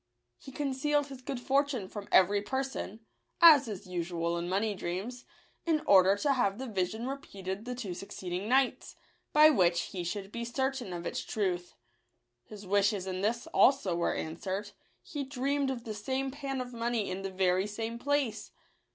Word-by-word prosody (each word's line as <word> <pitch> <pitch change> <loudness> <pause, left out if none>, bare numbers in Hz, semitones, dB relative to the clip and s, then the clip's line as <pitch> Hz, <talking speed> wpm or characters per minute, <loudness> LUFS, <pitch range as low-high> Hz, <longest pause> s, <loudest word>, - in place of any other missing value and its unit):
He 270 - -11
concealed 290 +1 0
his 270 -2 -9
good 255 0 -4
fortune 270 -4 +1
from 205 +1 -8
every 200 +2 +5
person, 265 -3 -4 0.4
as 310 -6 +8
is 205 -4 -6
usual 170 -1 -2
in 170 +1 -3
money 205 +3 +1
dreams, 200 +7 -5 0.4
in 315 -3 +1
order 190 0 +6
to 280 +6 +2
have 200 -6 +1
the 265 - -5
vision 215 +1 -2
repeated 200 -7 -5
the 250 0 -4
two 215 -7 -5
suc 195 +3 -9
ceeding 180 +2 -4
nights, 260 +1 +1 0.4
by 305 +1 +8
which 175 - +3
he 180 -3 -4
should 195 +3 -4
be 235 +1 -4
certain 260 -2 -2
of 175 -1 -5
its - - -2
truth. 180 -4 -2 0.7
His 205 - -11
wishes 200 0 +2
in 185 -1 -3
this 230 +4 0
also 260 -10 +4
were 170 - 0
answered; 190 +5 -4 0.3
he 290 -5 -4
dreamed 275 +1 -1
of 250 -3 -4
the 220 - -5
same 265 +6 -2
pan 275 -1 -4
of 250 0 -7
money 230 -2 -1
in 185 +1 -4
the 195 - -3
very 185 +1 +1
same 225 +2 -4
place. 285 -4 -1
220 Hz, 175 wpm, -31 LUFS, 190-265 Hz, 0.7 s, as